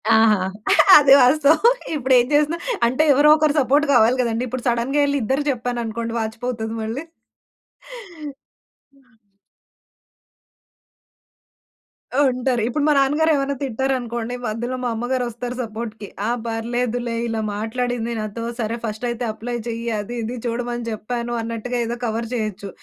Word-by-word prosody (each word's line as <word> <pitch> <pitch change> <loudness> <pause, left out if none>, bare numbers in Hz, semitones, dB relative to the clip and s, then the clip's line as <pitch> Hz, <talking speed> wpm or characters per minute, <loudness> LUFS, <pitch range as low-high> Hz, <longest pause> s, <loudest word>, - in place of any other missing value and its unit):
ఆహా! 220 -3 +5 0.6
అది 280 -2 +6
వాస్తవం. 300 - +5 0.3
ఇప్పుడేం 260 -3 +3
జేసినా 300 +3 +2 0.3
అంటే 260 +6 +1
ఎవరో 290 +3 +5
ఒకరు 305 -1 +2
సపోర్ట్ 285 +3 +3
గావాలి 245 +1 +4
గదండీ! 235 0 -1
ఇప్పుడు 255 +1 -5
సడెన్‌గా 240 +5 +1
ఎళ్లి 285 0 0
ఇద్దరు 265 +6 0
జెప్పాననుకోండి 235 -2 -3
వాచిపోతది 225 0 -4
మళ్ళీ. 230 +8 -4 1.9
నిజమే. 235 -7 -30 3.0
ఉంటారు. 250 -1 -1
ఇప్పుడు 285 +4 -1
మా 300 - +4
నాన్నగారు 295 +4 +3
ఏమ‌న్నా 275 0 -1
తిట్టారనుకోండి, 245 -2 -2
మధ్యలో 235 +4 -3
మా 245 - 0
అమ్మగారొస్తారు 245 0 -3
సపోర్ట్‌కి. 220 -2 -6 0.2
ఆ - - 0 0.2
పర్లేదులే 235 +1 -2
ఇలా 225 -1 -2
మాట్లాడింది 235 +2 -2
నాతో 215 +2 -5 0.2
సరే, 230 0 -2
ఫస్టైతే 235 +2 -3
అప్లై 240 +3 -5
జెయ్యి, 230 0 -4
అదీ 210 +4 -6
ఇదీ 240 +3 -4
చూడమని 240 0 -3
జెప్పాను 235 +2 -4
అన్నట్టుగా 230 +2 -4
ఏదో 235 +1 -4
కవర్ 230 0 -3
జేయచ్చు. 215 -4 -3
240 Hz, 120 wpm, -21 LUFS, 225-260 Hz, 3.0 s, అది